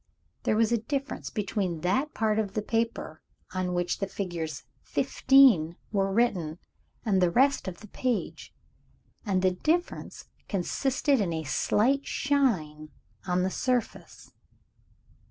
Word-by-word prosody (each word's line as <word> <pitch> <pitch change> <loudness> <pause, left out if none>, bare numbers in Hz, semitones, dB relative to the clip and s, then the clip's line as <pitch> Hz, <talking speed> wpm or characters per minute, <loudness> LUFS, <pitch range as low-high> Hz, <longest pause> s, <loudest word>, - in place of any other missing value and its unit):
There - - +2
was 225 0 +3
a 235 - +2
difference 275 +5 -4
between 195 -6 -2
that 260 - 0
part 220 -1 +1
of 205 -3 -3
the 215 - -1
paper 230 +1 -2 0.3
on 185 -1 -1
which 175 0 -1
the 195 - -1
figures 170 -7 -4 0.2
"15" 235 - +4 0.2
were 195 -2 +1
written, 185 -8 +1 0.5
and 195 -4 +2
the 180 - +4
rest 270 +7 +2
of 180 -2 -6
the 215 - -11
page 245 +2 -3 0.8
and 190 -2 +1
the 185 - +4
difference 325 - -2 0.2
consisted 260 +7 +1
in 185 -4 0
a 160 -1 -2
slight 255 - +1
shine 185 - 0 0.4
on 180 0 +1
the 190 - 0
surface. 250 +1 -3
205 Hz, 135 wpm, -28 LUFS, 180-250 Hz, 0.8 s, 15